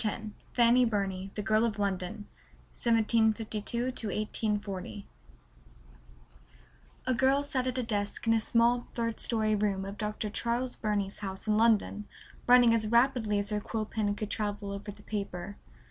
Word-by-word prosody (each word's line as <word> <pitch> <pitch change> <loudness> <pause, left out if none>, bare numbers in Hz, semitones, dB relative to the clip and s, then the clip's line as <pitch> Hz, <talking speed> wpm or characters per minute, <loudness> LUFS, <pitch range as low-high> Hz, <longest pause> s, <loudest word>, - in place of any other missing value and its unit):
X 215 - +2 0.4
Fanny 240 +1 +5
Burney 195 -4 -1
The 210 - -3
Girl 215 +2 +3
of 225 -3 0
London: 200 0 -2 0.5
1752 225 0 +1
1840 210 - -3 2.0
A 255 - +2
girl 265 +3 +3
sat 260 -3 -1
at 255 0 -2
a 255 - 0
desk 205 -2 -2
in 225 - +4
a 225 - +3
small 235 +2 +2
third 230 -2 -2
story 220 -2 +1
room 200 -2 0
of 200 +2 -7
Dr. 210 0 -3
Charles 240 +3 -1
Burney's 205 -2 -2
house 190 -2 -5
in 215 -1 +2
London, 215 -2 +2 0.4
writing 245 -1 +7
as 220 -2 +1
rapidly 235 -2 +3
as 200 +1 -1
her 210 0 0
quill 215 +1 -3
pen 210 -2 -1
could 210 0 -5
travel 205 -2 -2
over 200 +2 -6
the 205 +1 -16
paper. 200 -2 -5
215 Hz, 150 wpm, -30 LUFS, 205-235 Hz, 2.0 s, writing